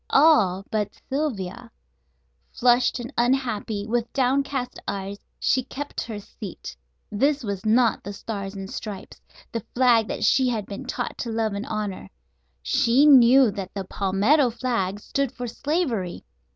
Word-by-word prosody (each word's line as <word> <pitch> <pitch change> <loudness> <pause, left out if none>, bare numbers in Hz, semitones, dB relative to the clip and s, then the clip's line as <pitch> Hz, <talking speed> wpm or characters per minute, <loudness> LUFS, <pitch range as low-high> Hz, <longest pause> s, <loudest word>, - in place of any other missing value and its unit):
All 210 - +4
but 210 -2 -2
Sylvia. 260 -10 -3 0.8
Flushed 245 +1 +3
and 240 0 -7
unhappy, 235 -5 0
with 235 +1 -1
downcast 270 0 0
eyes, 200 0 -4 0.2
she 260 - +2
kept 285 +3 -6
her 225 -2 -6
seat. 200 - -9 0.4
This 280 +6 +1
was 200 -3 -4
not 230 0 +3
the 200 - -6
"Stars 200 -1 -6
and 195 -1 -6
Stripes," 200 -1 -8 0.3
the 230 - -3
flag 240 -3 +4
she 255 +4 +4
had 220 -4 -2
been 205 +7 -7
taught 255 - -4
to 235 - -3
love 220 -2 -1
and 200 +1 -4
honor. 205 - -4 0.5
She 235 - +3
knew 260 -3 +7
that 195 -1 -7
the 195 - -3
palmetto 205 +10 +2
flag 225 -5 -2
stood 275 +4 -2
for 245 - -5
slavery. 240 - -2
230 Hz, 140 wpm, -24 LUFS, 200-260 Hz, 0.8 s, knew